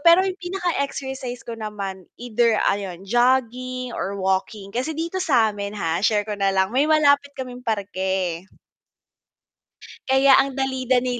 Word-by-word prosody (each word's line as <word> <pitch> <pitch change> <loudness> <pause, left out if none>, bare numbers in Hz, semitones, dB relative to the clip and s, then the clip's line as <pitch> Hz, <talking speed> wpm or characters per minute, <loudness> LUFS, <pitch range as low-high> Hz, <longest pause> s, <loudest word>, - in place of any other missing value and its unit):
pero 335 +4 +6
yung 380 -1 -3
pinaka 355 -2 -2
exercise 265 -3 -5
ko 235 - -6
naman 200 -4 -6
either 235 -1 +1 0.2
ayun, 195 -2 -5
jogging 255 +2 +1
or 200 +1 -3
walking. 195 +1 -2
Kasi 260 +8 -2
dito 335 +3 -3
sa'min 220 - +1
ha, 165 -3 -1
share 210 0 +2
ko 215 - -3
na 195 -1 +2
lang, 190 0 +2
may 270 +3 +4
malapit 285 -2 +4
kaming 250 -1 -6
parke. 190 -5 -2 1.6
Kaya 265 0 +6
ang 270 -1 0
dali-dali 255 -2 0
245 Hz, 140 wpm, -23 LUFS, 200-270 Hz, 1.6 s, pero